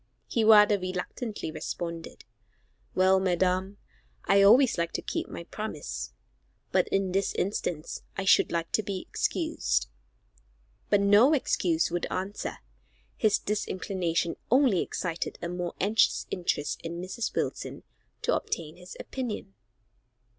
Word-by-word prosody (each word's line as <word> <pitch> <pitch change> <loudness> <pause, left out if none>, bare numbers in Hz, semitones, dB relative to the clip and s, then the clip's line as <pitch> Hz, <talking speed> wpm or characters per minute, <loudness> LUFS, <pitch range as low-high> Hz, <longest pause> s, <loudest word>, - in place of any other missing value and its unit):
He 230 - 0
rather 210 -1 +7
reluctantly 185 +2 -4
responded, 170 0 -6 0.7
"Well, 190 +1 +5
madam, 185 +1 0 0.5
I 200 0 +5
always 230 +1 +6
like 170 0 -1
to - - -2
keep - - -3
my - - -7
promise, 145 - -5 0.6
but - - +3
in 195 -1 0
this 195 +1 0
instance 175 -4 -2 0.2
I 195 - -2
should - - +5
like 170 -1 -2
to - - +2
be 195 -2 -4
excused." - - -1 1.0
But 205 -1 +4
no 205 +8 +6
excuse 170 - +1
would 175 0 -1
answer; 190 +3 -4 0.6
his 215 -2 +3
disinclination 185 -4 -2
only 250 -7 +4
excited 170 -2 -3
a 170 - -4
more 180 0 -4
anxious 210 +3 +2
interest 175 -5 -1
in 170 +1 -5
Mrs. 185 +6 -4
Wilson - - -3 0.4
to - - +2
obtain 160 0 -4
his 180 0 -11
opinion. 240 - -5
185 Hz, 125 wpm, -28 LUFS, 170-205 Hz, 1.0 s, rather